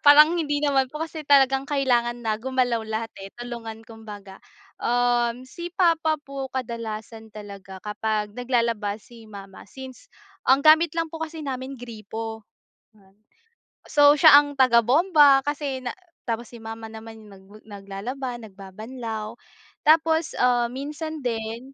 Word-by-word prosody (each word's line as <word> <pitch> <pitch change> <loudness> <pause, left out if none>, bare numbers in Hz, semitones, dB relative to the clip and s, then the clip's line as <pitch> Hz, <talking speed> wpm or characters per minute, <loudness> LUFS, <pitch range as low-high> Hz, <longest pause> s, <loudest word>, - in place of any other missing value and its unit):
parang 300 +2 +8
hindi 290 -3 -1
naman 270 -2 +2
po 300 - -9
kasi 315 -2 -7
talagang 270 -1 +4
kailangan 240 -4 +1
na 215 -1 0
gumalaw 255 -2 0
lahat, 220 +1 -3
eh, 195 - -8
tulungan 235 -2 -7
kumbaga. 210 -4 -11 0.4
Um, 245 0 +1
si 345 +7 -7
papa 330 -3 +2
po, 275 -2 -6
kadalasan 225 -3 -6
talaga 200 -2 -10
kapag 210 0 -2
naglalaba 230 -4 -1
si 230 -1 -16
mama, 195 -2 -11
since 265 - -11 0.4
ang 270 +2 +5
gamit 315 +1 +6
lang 330 -1 0
po 325 - -7
kasi 320 -1 -5
namin 265 0 -5
gripo, 225 -2 -7 0.5
yon 195 -2 -25 0.7
So, 290 -1 +6
siya 300 -1 +9
ang 290 0 0
tagabomba 270 - +5
kasi 290 -3 -3
na 245 - -2 0.3
tapos 230 -1 -3
si 240 - -12
mama 225 0 -7
naman 220 0 -11
'yong 215 - -15
nag 190 -1 -16 0.2
naglalaba, 220 +6 -6
nagbabanlaw. 215 +2 -7 0.5
Tapos, 320 +1 +3
ah, 245 -1 +3
minsan 305 +4 -5
din 235 +1 -4
245 Hz, 140 wpm, -24 LUFS, 220-285 Hz, 0.7 s, siya